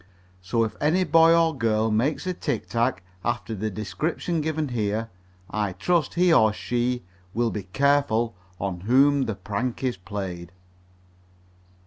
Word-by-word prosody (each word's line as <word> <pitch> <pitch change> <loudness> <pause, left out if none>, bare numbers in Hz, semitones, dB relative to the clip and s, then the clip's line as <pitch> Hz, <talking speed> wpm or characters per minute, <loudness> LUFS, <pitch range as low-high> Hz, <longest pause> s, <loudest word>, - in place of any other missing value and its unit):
So 105 +6 0
if 110 - -3
any 165 +5 +3
boy 165 0 +5
or 165 -2 +2
girl 110 -3 +1
makes 130 +11 0
a 185 - -1
tic - - -3
tac 115 -6 0 0.2
after 120 -1 -2
the 110 +1 -2
description 130 - -2
given 155 -1 -1
here, 110 -1 -2 0.4
I 105 -3 -1
trust 160 - 0
he 180 -1 +4
or 110 -7 +5
she 120 +2 -1 0.3
will 120 -1 +1
be 100 -3 -5
careful 120 0 +1 0.2
on 95 -3 -3
whom 135 +7 +4
the 110 - -3
prank 115 +6 -3
is 125 -5 0
played. 90 -3 -6
120 Hz, 145 wpm, -25 LUFS, 105-145 Hz, 0.4 s, boy